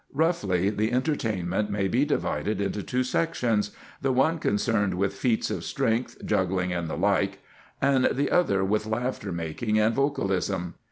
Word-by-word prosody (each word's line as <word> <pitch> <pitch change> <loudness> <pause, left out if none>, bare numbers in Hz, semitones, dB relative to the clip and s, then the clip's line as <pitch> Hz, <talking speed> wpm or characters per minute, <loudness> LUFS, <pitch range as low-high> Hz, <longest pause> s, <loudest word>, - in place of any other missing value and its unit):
Roughly, 105 - +1
the 110 +2 0
entertainment 110 - 0
may 100 -1 0
be 125 +8 +2
divided 110 -7 -1
into 100 +1 -1
two 125 +5 -1
sections, 125 -8 0 0.3
the 135 - +1
one 145 +6 +2
concerned 105 -5 +1
with 95 +1 0
feats 120 -4 0
of - - -3
strength, 125 -2 -1
juggling, 95 -3 0
and 85 -1 -2
the - - -4
like, 100 +1 +1 0.4
and 135 -1 +3
the 140 +2 +1
other 100 - +3
with 110 +2 0
laughter 110 -2 -2
making 85 +7 -2
and 110 +1 +3
vocalism. 95 - 0
105 Hz, 155 wpm, -26 LUFS, 95-130 Hz, 0.4 s, and